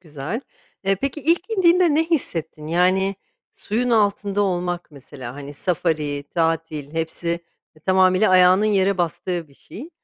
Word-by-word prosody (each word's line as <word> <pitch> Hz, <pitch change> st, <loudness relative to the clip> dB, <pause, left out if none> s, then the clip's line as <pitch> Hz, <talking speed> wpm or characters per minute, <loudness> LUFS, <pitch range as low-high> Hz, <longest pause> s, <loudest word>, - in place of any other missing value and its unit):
güzel. 155 Hz, -, -5 dB, 0.4 s
Eee, 195 Hz, 0 st, +3 dB
peki, 275 Hz, +2 st, -2 dB
ilk 340 Hz, +6 st, +1 dB
indiğinde 355 Hz, -5 st, +4 dB
ne 320 Hz, -, +3 dB
hissettin? 165 Hz, -, -2 dB
Yani, 185 Hz, +4 st, +2 dB, 0.4 s
suyun 245 Hz, +4 st, -2 dB
altında 205 Hz, -2 st, +1 dB
olmak 175 Hz, -2 st, -2 dB
mesela, 130 Hz, -3 st, -10 dB
hani, 145 Hz, 0 st, -8 dB
safari, 150 Hz, -4 st, -1 dB
tatil 165 Hz, -3 st, -1 dB
hepsi, 165 Hz, +1 st, -3 dB
eee, 170 Hz, -2 st, -7 dB
tamamıyla 185 Hz, +2 st, +4 dB
ayağının 185 Hz, +2 st, +5 dB
yere 195 Hz, -2 st, +2 dB
bastığı 170 Hz, 0 st, -2 dB
bir 140 Hz, -, -22 dB
şey. 270 Hz, -, -11 dB
180 Hz, 140 wpm, -22 LUFS, 160-205 Hz, 0.4 s, ayağının